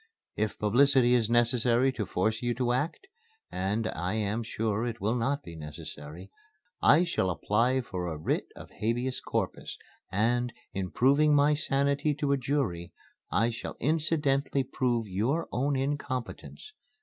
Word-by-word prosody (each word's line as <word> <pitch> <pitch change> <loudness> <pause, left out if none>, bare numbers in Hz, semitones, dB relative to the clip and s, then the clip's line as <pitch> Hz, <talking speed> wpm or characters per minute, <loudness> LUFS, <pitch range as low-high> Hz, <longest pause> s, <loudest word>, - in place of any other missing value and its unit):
If 110 0 -1
publicity 125 +3 +4
is 115 -3 +2
necessary 120 +2 +3
to 110 -7 -4
force 110 +6 0
you 120 -1 -1
to 125 0 0
act 150 - -2 0.5
and 105 +4 -1
I 90 +5 -3
am 110 +1 -1
sure 110 -1 -2
it 115 -1 -5
will 110 +3 0
not 135 +4 -1
be 85 - -9
necessary 80 +3 -9 0.5
I 155 +5 +6
shall 170 - 0
apply 115 +8 +1
for 90 -7 -5
a 80 -2 -4
writ 75 - -1
of - - -11
habeas 120 +4 -2
corpus, - - -3 0.3
and, 120 +5 +1 0.2
in 95 -2 -3
proving 145 - +4
my 145 +1 +4
sanity 140 0 +1
to 145 -1 -1
a 140 - +3
jury, 120 -11 -2 0.4
I 115 +3 +2
shall 115 - -7
incidentally 145 -2 +1
prove 120 -2 -1
your 115 - -1
own 140 +3 0
incompetence. 135 - -4
120 Hz, 150 wpm, -29 LUFS, 105-140 Hz, 0.5 s, I